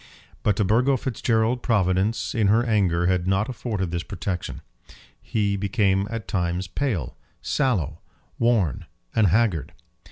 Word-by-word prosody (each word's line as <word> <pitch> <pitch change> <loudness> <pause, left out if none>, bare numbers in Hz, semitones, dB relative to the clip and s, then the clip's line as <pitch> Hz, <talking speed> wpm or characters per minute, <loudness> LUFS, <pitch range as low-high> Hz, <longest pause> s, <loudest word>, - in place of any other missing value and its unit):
But 105 - +2
to 105 - +1
Burgo 125 +7 +3
Fitzgerald 115 -1 0
Providence 100 0 +1
in 110 -3 +2
her 110 +4 +4
anger 95 -7 +2
had 90 -1 +1
not 95 +5 +1
afforded 105 -8 -3
this 85 -1 -1
protection. 90 +1 -4 0.6
He 100 -2 0
became 100 0 +1
at 115 -3 -5
times 90 0 -1
pale, 95 - -2 0.3
sallow, 90 - 0 0.4
worn, 110 - +1 0.3
and 110 -3 +4
haggard. 95 -3 +1
100 Hz, 130 wpm, -24 LUFS, 90-115 Hz, 0.6 s, her